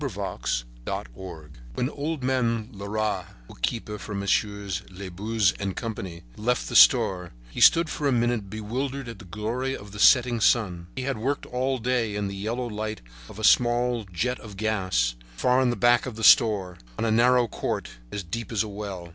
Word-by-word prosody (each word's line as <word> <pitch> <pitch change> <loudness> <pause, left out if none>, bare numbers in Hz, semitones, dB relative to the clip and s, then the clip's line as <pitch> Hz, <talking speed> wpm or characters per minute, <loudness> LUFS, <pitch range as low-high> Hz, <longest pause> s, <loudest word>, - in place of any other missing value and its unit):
A 140 - -1
STROLL 75 - -5 0.3
When 125 - 0
Old 150 -1 -4
Man 115 -4 0
Leras, 100 -1 -2 0.2
bookkeeper 105 - -4
for 105 +1 -6
Messieurs 100 -1 -1
Labuze 100 +2 -1
and 100 -2 -3
Company, 95 -7 -5
left 125 +3 -1
the - - -5
store, 90 +8 +5 0.2
he - - -5
stood 170 0 +7
for 150 -1 -2
a - - +2
minute 120 -4 0
bewildered 125 +6 -4
at 115 -4 -8
the 100 - -12
glory 115 +8 -3
of 100 0 -12
the 105 - -9
setting 120 0 +5
sun. 90 -9 +2
He 130 - -3
had 135 -3 -2
worked 140 +5 -1
all 130 +2 -1
day 120 -3 0
in 105 -1 -1
the 100 - -5
yellow 115 +5 -3
light 110 -1 -4 0.3
of - - -11
a 110 - -7
small 120 -1 +3
jet 125 +8 -1
of 105 -3 -11
gas, 95 - 0 0.2
far 125 - +3
in 130 - +3
the 120 - 0
back 120 0 +3
of 125 - -6
the 110 - -6
store, 100 -7 +5 0.2
on - - -1
a 110 - +1
narrow 120 +2 +4
court, - - -3 0.2
as 100 - -4
deep 110 +9 -5
as 110 -2 +1
a - - -6
well. 100 -4 -6
110 Hz, 185 wpm, -26 LUFS, 95-120 Hz, 0.3 s, stood